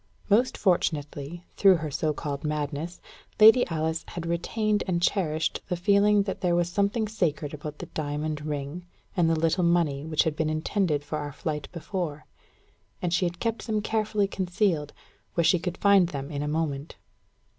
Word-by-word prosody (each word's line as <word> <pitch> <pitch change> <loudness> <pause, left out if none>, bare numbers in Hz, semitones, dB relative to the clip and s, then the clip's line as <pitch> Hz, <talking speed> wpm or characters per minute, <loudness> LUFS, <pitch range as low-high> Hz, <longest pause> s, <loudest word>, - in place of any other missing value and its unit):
Most 240 +5 +3
fortunately, 160 -3 -1
through 195 -1 +7
all - - +2
her 155 - -3
so 155 +2 0
called 145 -2 -4
madness, 150 +3 -3 0.4
Lady 225 +4 +8
Alice 160 -1 -1
had 170 -1 -6
retained 210 +5 0
and 175 -2 +1
cherished 160 -4 0
the 180 - 0
feeling 200 +3 +4
that 195 - -4
there 175 -2 +2
was 175 0 +1
something 200 +4 0
sacred 160 -8 -1
about 150 0 -7
the - - -6
diamond 150 0 -3
ring 150 +4 -4 0.3
and 170 -4 +3
the 165 -1 +2
little 165 +3 +2
money 170 -5 +2
which 155 -1 +1
had 160 -2 -1
been 155 0 0
intended 155 -1 0
for 150 +1 -4
our 145 -1 -4
flight 150 0 -4
before; 170 -3 -4 0.7
and 175 -2 -1
she 180 +1 +2
had 175 0 -6
kept 230 -1 -2
them 215 -1 +1
carefully 215 -1 0
concealed, 180 -5 0 0.4
where 170 - +3
she 180 +2 +4
could 180 +1 -4
find 200 -3 +5
them 140 -1 -5
in 145 -1 -3
a 150 - -2
moment. 150 -1 -2
170 Hz, 175 wpm, -27 LUFS, 150-195 Hz, 0.7 s, Lady